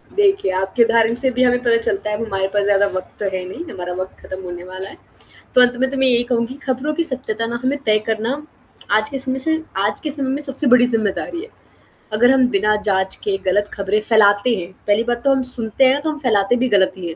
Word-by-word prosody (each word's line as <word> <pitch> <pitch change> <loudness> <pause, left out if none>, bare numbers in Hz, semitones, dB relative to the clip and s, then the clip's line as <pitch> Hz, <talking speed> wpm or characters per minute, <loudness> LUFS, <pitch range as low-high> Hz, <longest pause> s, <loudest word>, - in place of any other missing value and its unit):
देखिए 395 - +2
आपके 195 +5 +2
उदाहरण 230 0 +3
से 260 - +2
भी 255 - +3
हमें 245 0 +3
पता 230 -1 +3
चलता 210 -2 -2
है 210 - -1
अब 230 - -3
हमारे 195 -3 -1
पास 205 - +2
ज़्यादा 200 0 +3
वक़्त 185 - -5
तो 205 - -2
है 185 -1 -2
नहीं 340 - -7
हमारा 180 -1 -5
वक़्त 185 0 -6
खत्म 185 0 -8
होने 175 -1 -7
वाला 185 +1 -8
है, - - -13 0.6
तो 250 - +7
अंत 245 0 +3
में 265 - +2
तो 275 - -4
मैं 265 0 +3
यही 240 -1 +3
कहूँगी 235 +2 0
खबरों 265 +4 -1
की 335 - 0
सत्यता 250 -6 -1
ना 235 - -3
हमें 275 +3 0
तय 215 0 +3
करना 225 +3 -1 0.6
आज 215 0 -1
के 270 - -4
समय 265 0 -2
से 320 +4 0 0.2
आज 205 - -1
के 300 - -2
समय 275 -2 0
में 280 +2 -2
सबसे 275 0 -1
बड़ी 245 0 +6
ज़िम्मेदारी 225 - -2
है, 440 - -9 0.7
अगर 245 +4 +4
हम 260 -2 +4
बिना 210 +2 +2
जाँच 190 -1 +1
के 200 -1 0
गलत 205 +3 +1
ख़बरें 200 +1 0
फ़ैलाते 210 +1 +4
हैं 180 -2 -6 0.2
पहली 205 +3 +3
बात 240 0 -2
तो 275 - +3
हम 265 - 0
सुनते 230 +3 +1
हैं 260 - +5
ना, 280 - -1
तो 310 +2 -2
हम 300 - -7
फ़ैलाते 220 -4 +2
भी 255 - +1
गलत 190 -1 +3
ही 175 -2 -6
हैं, 165 - -6
230 Hz, 250 wpm, -19 LUFS, 200-260 Hz, 0.7 s, तो